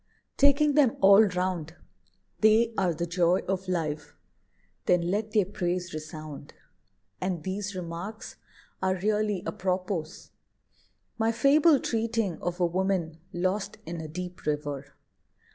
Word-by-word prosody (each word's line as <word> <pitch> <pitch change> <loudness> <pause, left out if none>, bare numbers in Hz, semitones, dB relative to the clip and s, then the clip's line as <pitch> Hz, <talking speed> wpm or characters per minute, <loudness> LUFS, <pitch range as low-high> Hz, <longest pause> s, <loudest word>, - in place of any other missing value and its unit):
Taking 285 +1 +4
them 275 -5 +4
all 200 +2 +8
round, 180 -4 -2 0.6
They 225 +2 +4
are 185 -4 +2
the 170 +1 -2
joy 175 +1 +2
of 190 0 -2
life, 160 -4 -3 0.7
then 175 0 +3
let 210 +2 -1
their 210 -3 +4
praise 180 -2 -3
resound. 155 -2 -8 0.7
And 180 -4 -2
these 195 +2 -4
remarks 180 +4 -6 0.4
are 185 0 +1
really 210 0 0
apropos: 185 -4 -1 1.1
My 225 0 +3
fable 285 +5 +5
treating 225 -6 -1
of 175 +1 -3
a 180 - +3
woman 175 -2 -1
lost 195 +4 -1
In 170 -1 -5
a 155 - -6
deep 180 +2 -7
river. 145 -2 -3
185 Hz, 125 wpm, -28 LUFS, 170-210 Hz, 1.1 s, all